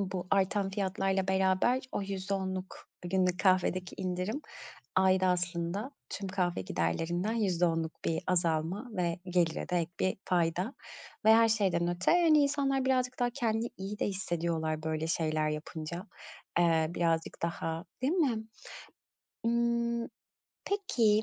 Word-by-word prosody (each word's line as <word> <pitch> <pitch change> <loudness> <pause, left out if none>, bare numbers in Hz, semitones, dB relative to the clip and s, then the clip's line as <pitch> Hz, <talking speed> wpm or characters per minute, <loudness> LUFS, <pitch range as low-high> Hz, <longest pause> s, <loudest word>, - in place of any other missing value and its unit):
bu 185 -2 -3
artan 195 0 +2
fiyatlarla 195 -1 0
beraber 190 +6 +3
o - - -1
%10’luk 190 -1 -4
günlük 180 0 +1
kahvedeki 185 -1 +2
indirim 185 +7 -2 0.6
ayda 185 0 +4
aslında 180 +5 -1 0.2
tüm 200 -1 -5
kahve 180 - 0
giderlerinden 165 - -1
%10’luk 175 -7 0
bir 165 - 0
azalma 175 +4 0
ve 175 -4 -1
gelire 175 -3 0
de 180 - 0
ek 165 -1 -2
bir 185 - +1
fayda. 180 +6 0 0.5
Ve 220 0 +8
her 230 0 +6
şeyden 190 -6 +2
öte, 175 +1 +1
hani, 335 -3 +5
insanlar 275 -2 +1
birazcık 255 -1 +1
daha 245 -1 +2
kendini 235 -2 -1
iyi 195 +2 -5
de - - +1
hissediyorlar, 170 -5 -2
böyle, 160 0 -1
şeyler 155 -2 0
yapınca. 155 +3 -5 0.5
Eee, 165 -2 +4
birazcık 165 -2 -1
daha 165 0 -2 0.2
Değil 275 +6 +2
mi? 260 -12 +1 1.0
Imm, 235 0 +1 0.6
peki, 235 - +2
185 Hz, 125 wpm, -31 LUFS, 170-220 Hz, 1.0 s, Ve